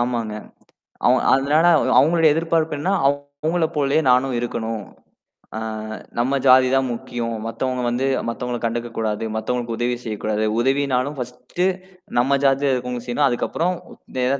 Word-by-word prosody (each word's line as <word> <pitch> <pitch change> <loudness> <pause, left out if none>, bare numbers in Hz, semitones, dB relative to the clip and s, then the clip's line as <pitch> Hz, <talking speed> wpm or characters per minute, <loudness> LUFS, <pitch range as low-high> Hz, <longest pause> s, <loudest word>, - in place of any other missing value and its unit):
ஆமாங்க. 120 -3 -1 0.7
அவ் - - +5 0.2
அதனால 145 +5 +3 0.3
அவங்களோட 165 +2 +3
எதிர்பார்ப்பு 160 -1 0
என்னன்னா 180 +7 0
அவங்கள 145 +4 -1
போலேயே 145 +2 +2
நானும் 130 +1 +2
இருக்கணும். 115 -3 -3 0.7
ஆ, - - -2 0.6
"நம்ம 135 +3 +1
ஜாதிதான் 130 0 +5
முக்கியம். 115 0 -4
மத்தவங்க 125 +2 -2
வந்து 120 +3 -1 0.2
மத்தவங்கள 120 0 -3
கண்டுக்கக் 115 0 -3
கூடாது. 110 -1 -1
மத்தவங்களுக்கு 120 +1 -2
உதவி 120 0 0
செய்யக் 110 -2 -5
கூடாது. 110 0 0
உதவின்னாலும் 135 +1 +1
ஃபர்ஸ்ட்டு, 125 +8 -3 0.5
நம்ம 140 +3 +3
ஜாதியில 135 +1 +3
இருக்குறவங்களுக்கு 125 -1 -4
செய்யணும். 140 +4 +2
அதுக்கப்புறம் 170 +8 -1 0.5
எதா 135 +2 +1
125 Hz, 130 wpm, -21 LUFS, 120-140 Hz, 0.7 s, அவ்